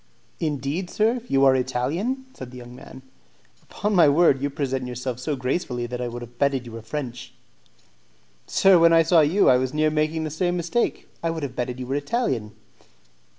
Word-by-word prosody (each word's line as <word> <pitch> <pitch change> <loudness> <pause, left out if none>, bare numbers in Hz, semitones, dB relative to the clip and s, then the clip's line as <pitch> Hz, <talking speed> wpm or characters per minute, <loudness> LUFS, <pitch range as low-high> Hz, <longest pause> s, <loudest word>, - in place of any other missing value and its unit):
"Indeed, 155 +3 -2
sir, 230 +3 +1
you 135 0 +3
are 135 -1 +6
Italian?" 165 - -2
said 130 - -9
the 125 - -11
young 120 0 -11
man. 130 +1 -12 0.6
"Upon 210 +1 -3
my 170 -6 +6
word, 145 -3 +4
you 145 - 0
present 135 -2 -3
yourself 125 0 -5
so 145 +3 -2
gracefully 125 -1 -2
that 125 +1 -5
I 125 - -2
would 120 0 -6
have 120 0 -14
betted 135 -3 +1
you 120 - -9
were 115 0 -8
French." 120 0 -6 1.1
"Sir, 195 -2 +5
when 165 0 +6
I 165 0 +6
saw 165 0 +5
you, 170 +7 +3
I 125 - +6
was 130 +2 -2
near 155 0 +2
making 155 +1 0
the 155 - -4
same 175 +3 -1
mistake; 175 +8 -1
I 165 - -1
would 165 -2 -4
have 130 -3 -5
betted 125 +1 -3
you 125 - -4
were 130 - -3
Italian." 140 - -2
140 Hz, 195 wpm, -24 LUFS, 125-165 Hz, 1.1 s, are